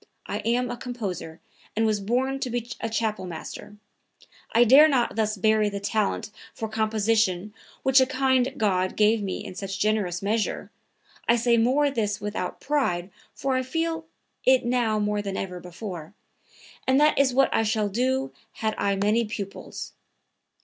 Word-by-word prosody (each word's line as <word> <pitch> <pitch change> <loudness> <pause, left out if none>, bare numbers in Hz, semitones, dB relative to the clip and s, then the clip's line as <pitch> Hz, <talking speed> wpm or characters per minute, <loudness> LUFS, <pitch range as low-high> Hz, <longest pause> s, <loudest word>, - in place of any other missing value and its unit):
I - - -3
am 245 +2 0
a - - -5
composer 200 -10 -5 0.3
and 225 +1 +2
was 215 -2 +1
born 255 +6 0
to 255 - -2
be 240 0 -3
a 225 - -2
chapelmaster. 210 -2 -4 0.7
I 235 - +6
dare 270 +6 +8
not 260 -5 +1
thus 215 -1 0
bury 215 +1 +3
the 200 0 -4
talent 210 0 -1 0.2
for 220 - -3
composition 215 -3 +1 0.3
which 265 0 +6
a 260 - +3
kind 260 -1 +2
God 185 -3 +1
gave 215 +1 +3
me 195 -2 -4
in - - -7
such 195 +1 -5
generous 200 -4 0
measure 215 +2 -1 0.6
(I 235 - +6
may - - +3
say 240 +5 +3
this 210 -5 -1
without 205 -3 -4
pride 200 -11 -1 0.2
for 270 -1 -1
I 255 - +2
feel 325 +4 -2 0.4
it 260 -1 +4
now 240 -3 +1
more 210 0 0
than 195 -1 -4
ever 180 -2 -4
before), 180 -1 -8 0.7
and 260 +1 +4
that 300 -1 +4
is 275 -2 +4
what 270 +2 +3
I - - +3
should 215 -2 0
do 260 +5 0 0.2
had 220 -1 -1
I 200 0 +1
many 210 +4 +2
pupils. 200 -2 -6
220 Hz, 165 wpm, -25 LUFS, 205-250 Hz, 0.7 s, dare